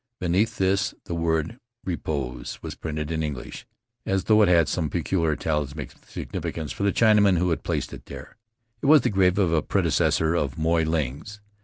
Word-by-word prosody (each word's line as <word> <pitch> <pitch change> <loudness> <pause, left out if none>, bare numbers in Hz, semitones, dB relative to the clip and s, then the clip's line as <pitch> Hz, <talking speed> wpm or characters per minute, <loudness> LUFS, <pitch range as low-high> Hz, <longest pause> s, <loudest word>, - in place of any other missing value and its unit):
Beneath 100 +6 +1
this 95 0 +1
the - - -5
word 80 - -1 0.3
"Repose" 75 -8 -4
was - - -5
printed 75 -1 -5
in 80 -1 -1
English, 75 -4 -6 0.4
as 95 -1 0
though 110 -1 +4
it 105 - +5
had 85 -2 +4
some 80 -4 -1
peculiar 85 -1 0
talismanic 75 -2 -3 0.2
significance 80 -3 -5
for - - -7
the 100 0 +3
Chinaman 105 -4 +4
who 90 +1 +1
had 80 - -1
placed - - -3
it - - -11
there. - - -10 0.5
It - - -1
was 150 -1 +7
the - - 0
grave 95 -1 +3
of 90 -5 +2
a 80 - +3
predecessor 80 +2 +1
of 70 -6 -1
Moy 80 +1 +2
Ling's. 80 +5 -3
85 Hz, 180 wpm, -25 LUFS, 80-95 Hz, 0.5 s, was